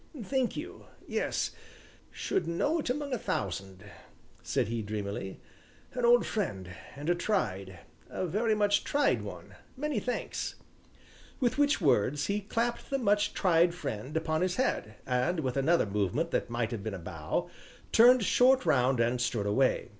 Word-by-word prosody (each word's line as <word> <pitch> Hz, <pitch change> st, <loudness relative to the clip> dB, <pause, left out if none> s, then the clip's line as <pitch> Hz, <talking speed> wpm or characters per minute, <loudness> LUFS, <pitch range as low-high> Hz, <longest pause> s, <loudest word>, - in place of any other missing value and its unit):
"Thank 260 Hz, +3 st, -1 dB
you -, -, -8 dB, 0.2 s
yes -, -, -1 dB, 0.6 s
should 170 Hz, -, -2 dB
know 290 Hz, -, 0 dB
it 295 Hz, -, -3 dB
among 280 Hz, +1 st, -2 dB
a 245 Hz, -, -1 dB
thousand," 95 Hz, -, -3 dB, 0.6 s
said -, -, 0 dB
he 115 Hz, 0 st, -2 dB
dreamily, 100 Hz, -2 st, -4 dB, 0.5 s
"an 245 Hz, -1 st, 0 dB
old 240 Hz, 0 st, +5 dB
friend 95 Hz, -, -3 dB, 0.2 s
and 145 Hz, +2 st, -7 dB
a 175 Hz, -, +4 dB
tried 100 Hz, -, -2 dB, 0.3 s
a -, -, -3 dB
very 215 Hz, +5 st, +1 dB
much 205 Hz, -1 st, +2 dB
tried 285 Hz, 0 st, +2 dB
one -, -, -9 dB, 0.2 s
many 300 Hz, +1 st, -1 dB
thanks." 250 Hz, -, -3 dB, 0.8 s
With 250 Hz, +1 st, +1 dB
which 290 Hz, 0 st, +3 dB
words 135 Hz, +8 st, +2 dB
he 205 Hz, +1 st, -1 dB
clapped 230 Hz, +3 st, -2 dB
the 275 Hz, -, +1 dB
much 205 Hz, -4 st, +1 dB
tried 170 Hz, -2 st, +3 dB
friend 130 Hz, -1 st, -4 dB
upon 160 Hz, 0 st, 0 dB
his 185 Hz, 0 st, +1 dB
head, 110 Hz, -, -1 dB
and 130 Hz, +7 st, 0 dB
with 130 Hz, -3 st, -2 dB
another 155 Hz, +3 st, +3 dB
movement 100 Hz, -2 st, -1 dB
that -, -, -1 dB
might 120 Hz, -1 st, -1 dB
have 115 Hz, -4 st, -4 dB
been 105 Hz, -1 st, -4 dB
a -, -, -5 dB
bow, 80 Hz, -3 st, -4 dB, 0.4 s
turned 245 Hz, +1 st, +7 dB
short 255 Hz, +5 st, +4 dB
round 125 Hz, -1 st, +3 dB
and 120 Hz, +1 st, +1 dB
strode 115 Hz, -4 st, 0 dB
away. 130 Hz, +6 st, +1 dB
165 Hz, 160 wpm, -30 LUFS, -, 0.8 s, turned